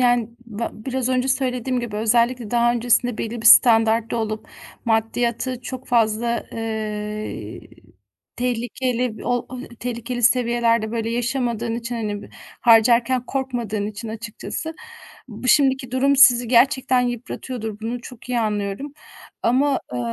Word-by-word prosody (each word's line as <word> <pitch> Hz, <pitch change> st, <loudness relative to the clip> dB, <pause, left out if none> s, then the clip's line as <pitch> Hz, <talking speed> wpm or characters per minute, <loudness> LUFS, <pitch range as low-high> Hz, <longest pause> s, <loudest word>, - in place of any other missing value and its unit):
yani, 245 Hz, -2 st, +3 dB, 0.2 s
ba 230 Hz, +1 st, -4 dB
biraz 255 Hz, +3 st, -3 dB
önce 255 Hz, +1 st, +1 dB
söylediğim 255 Hz, -1 st, 0 dB
gibi, 220 Hz, -3 st, -5 dB
özellikle 235 Hz, +1 st, +1 dB
daha 240 Hz, 0 st, +3 dB
öncesinde 245 Hz, 0 st, +1 dB
belli 230 Hz, +1 st, -4 dB
bir -, -, +1 dB
standartta 225 Hz, -1 st, +6 dB
olup 215 Hz, -1 st, -3 dB, 0.4 s
maddiyatı 235 Hz, +2 st, 0 dB
çok 260 Hz, +1 st, -7 dB
fazla 235 Hz, 0 st, +1 dB
eee, 215 Hz, -1 st, -4 dB, 0.8 s
tehlikeli 245 Hz, -1 st, -2 dB
bir -, -, -9 dB
ol 245 Hz, +1 st, -1 dB
ay, 255 Hz, 0 st, -8 dB
tehlikeli 240 Hz, +1 st, -5 dB
seviyelerde, 235 Hz, -2 st, +2 dB
böyle, 230 Hz, -1 st, -2 dB
yaşamadığın 240 Hz, -1 st, -1 dB
için, 235 Hz, +1 st, -4 dB
hani, 210 Hz, -3 st, -3 dB
b -, -, -12 dB, 0.3 s
harcarken 235 Hz, +2 st, +4 dB
korkmadığın 240 Hz, -6 st, -2 dB
için 215 Hz, +2 st, -7 dB
açıkçası, 230 Hz, +8 st, -6 dB, 0.5 s
bu 240 Hz, +3 st, -6 dB
şimdiki 265 Hz, -3 st, +3 dB
durum 275 Hz, +2 st, +2 dB
sizi 245 Hz, -3 st, +6 dB
gerçekten 255 Hz, +1 st, +4 dB
yıpratıyordur. 240 Hz, -2 st, -4 dB
Bunu 235 Hz, +2 st, -4 dB
çok 240 Hz, 0 st, -12 dB
iyi 245 Hz, -1 st, 0 dB
anlıyorum 210 Hz, +6 st, -2 dB, 0.5 s
ama, 270 Hz, +3 st, +2 dB
eee, 125 Hz, -, -3 dB
235 Hz, 130 wpm, -22 LUFS, 225-250 Hz, 0.8 s, standartta